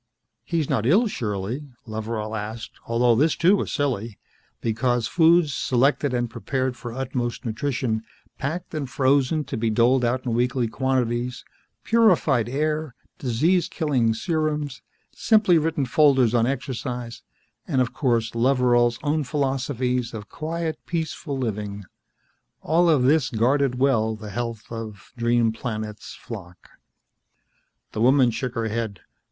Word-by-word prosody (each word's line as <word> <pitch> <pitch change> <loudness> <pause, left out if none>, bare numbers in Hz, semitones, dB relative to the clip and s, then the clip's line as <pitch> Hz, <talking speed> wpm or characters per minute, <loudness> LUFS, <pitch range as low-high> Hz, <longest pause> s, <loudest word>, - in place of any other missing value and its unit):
"He's 165 -4 -1
not 115 +1 0
ill, 200 - +5
surely?" 115 - -3 0.2
Loveral 110 -1 -4
asked, 110 +2 -5 0.2
although 120 +1 +3
this, 145 +7 +3
too, 180 +4 +4
was - - -3
silly, 120 -7 -2 0.4
because 120 +1 0
foods, 165 -2 +4
selected 135 +3 +1
and 120 -1 0
prepared 130 +2 -2
for 120 -1 -7
utmost 125 0 -3
nutrition, 120 -1 -1 0.4
packed 165 +7 -4
and 145 -4 -3
frozen 140 +3 +2
to - - -5
be 115 0 0
doled 120 +4 +3
out 125 +2 0
in 120 - -1
weekly 125 +1 +1
quantities, 125 -1 -1 0.4
purified 175 - +3
air, 150 0 -1 0.2
disease 155 +9 +2
killing 130 -9 +1
serums, 150 -1 -2 0.3
simply 210 -7 +4
written 155 -3 0
folders 130 -3 +4
on 120 -1 +3
exercise, 125 -3 -4 0.5
and 140 -6 +1
of 125 -2 +1
course 115 -5 0
Loveral's 120 -1 +3
own 150 +1 +1
philosophies 130 -3 -1
of 105 -1 -8
quiet, 160 0 -3
peaceful 160 -3 -3
living 105 -4 -3 0.8
all 170 +3 +3
of 150 -6 +4
this 140 +1 +3
guarded 125 +3 +1
well 115 -5 +2
the 105 -1 -9
health 115 0 -4
of 110 -3 -7
Dream 120 -1 +2
Planet's 110 -2 -6
flock. 90 -6 -10 1.2
The 110 - -3
woman 130 0 +5
shook 120 +2 -4
her 115 -1 -1
head. 110 -3 -3
125 Hz, 135 wpm, -24 LUFS, 115-145 Hz, 1.2 s, ill